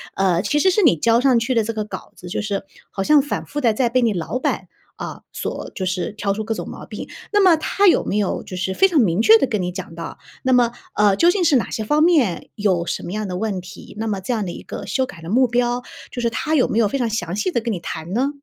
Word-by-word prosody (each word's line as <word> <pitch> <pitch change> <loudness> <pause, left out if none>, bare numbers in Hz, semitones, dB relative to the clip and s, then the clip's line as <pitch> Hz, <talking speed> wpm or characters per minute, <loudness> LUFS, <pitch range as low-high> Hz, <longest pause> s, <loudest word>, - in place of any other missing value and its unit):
呃， 185 -3 +2
其 295 - 0
实 375 - +4
是 420 - +2
你 275 - +6
交 230 +8 +3
上 260 -3 +4
去 230 +3 -1
的 230 - +2
这 230 - -2
个 215 -1 -2
稿 210 - -8
子 180 - -10
就 - - -2
是 200 -2 -2 0.3
好 195 - -2
像 300 +2 +5
反 290 - -4
复 290 +1 -4
地 230 -3 +3
在 240 +2 +1
被 255 +1 +2
你 230 -3 +2
老 195 +7 -3
板， - - -2 0.3
啊， - - -7
所 - - -4
就 185 - -3
是 185 +1 -2
挑 205 -1 -2
出 220 +1 -3
各 225 +1 -2
种 - - -5
毛 - - -9
病。 - - -8 0.2
那 415 - +5
么 365 -4 +6
他 400 +5 +2
有 - - +5
没 205 - -1
有 205 -3 0
就 185 - -8
是 190 +1 -1
非 385 - +5
常 330 -6 +2
明 190 -1 +2
确 225 0 +8
地 270 - +2
跟 215 -5 -1
你 180 0 -2
讲 180 -3 -7
到 165 0 -7 0.3
那 260 0 +2
么， 240 -1 +4 0.2
呃， 205 -2 +4
究 340 - +5
竟 380 -2 0
是 300 -4 +4
哪 240 - -1
些 220 - -2
方 295 +7 +2
面 295 - +2
有 190 -5 +1
什 170 - -3
么 175 - -6
样 215 -1 -2
的 180 - -4
问 205 -2 -2
题。 - - -12
那 225 - -2
么 205 -3 -1
这 245 +6 -2
样 215 -3 -1
的 175 - -4
一 - - -9
个 - - -7
修 260 +7 0
改 170 -9 -12
的 165 - -8
目 250 +5 +4
标， 245 +1 0 0.3
就 245 - -4
是 235 - +1
他 310 +7 -1
有 255 - +4
没 220 - +1
有 220 - +4
非 275 - -2
常 235 -2 0
详 180 -5 -3
细 210 - -1
地 240 - +1
跟 230 -1 -2
你 180 - -4
谈 165 +1 -6
呢？ 260 +5 +1
220 Hz, 315 characters per minute, -21 LUFS, 195-255 Hz, 0.3 s, 确